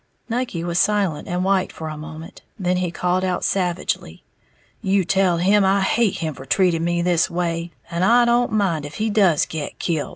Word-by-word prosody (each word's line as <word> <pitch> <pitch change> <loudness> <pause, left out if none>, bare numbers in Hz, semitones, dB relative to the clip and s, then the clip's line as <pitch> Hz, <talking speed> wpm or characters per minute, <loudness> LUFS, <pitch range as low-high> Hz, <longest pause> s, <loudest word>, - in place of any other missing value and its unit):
Nucky 230 -8 -2
was 175 0 -1
silent 195 -8 +1
and 180 +1 -1
white 190 -1 +1
for 160 - -7
a 155 - -5
moment; 160 +1 -10 0.2
then 180 -3 0
he 180 -1 -1
called 180 +2 -1
out 185 -1 -1
savagely, 180 -2 -2 0.6
"You 195 -3 +1
tell 185 0 +2
him 195 +4 +3
I 195 +1 +3
hate 210 +1 +1
him 160 -3 -3
for 130 - -11
treating 170 +2 +2
me 175 0 0
this 175 -2 +2
way, 170 -1 -2 0.2
and 170 +1 -1
I 240 +4 +5
don't 240 +1 +2
mind 190 -8 0
if 145 - -12
he 215 0 -1
does 190 -8 +3
get 155 -2 -6
kilt!" 160 -4 -2
180 Hz, 195 wpm, -21 LUFS, 170-195 Hz, 0.6 s, I